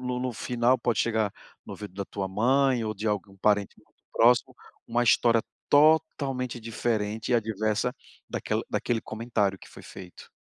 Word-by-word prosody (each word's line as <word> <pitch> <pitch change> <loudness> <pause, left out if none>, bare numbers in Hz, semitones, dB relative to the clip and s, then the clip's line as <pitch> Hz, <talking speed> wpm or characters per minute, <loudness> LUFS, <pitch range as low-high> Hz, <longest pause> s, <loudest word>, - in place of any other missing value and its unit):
no 125 0 -3
no 130 0 -2
final 120 +2 +1
pode 120 - 0
chegar 110 -3 +1 0.3
no - - -9
ouvido 105 -3 -9
da 100 0 -4
tua 95 0 -4
mãe 125 +4 +2
ou 110 - -3
de 105 +2 -5
algum 105 -2 -2
parente 105 0 +1
mais - - -37 0.2
próximo, 120 +1 +4 0.3
uma 120 +1 +1
história 115 0 +4 0.3
totalmente 145 -5 +2
diferente 110 -1 -2
e 125 - +4
adversa 110 +1 0 0.3
daquel - - -2
daquele 120 -2 -1
comentário 110 -4 -2
que - - -14
foi - - -13
feito. 90 -2 -12
115 Hz, 160 wpm, -27 LUFS, 105-125 Hz, 0.3 s, próximo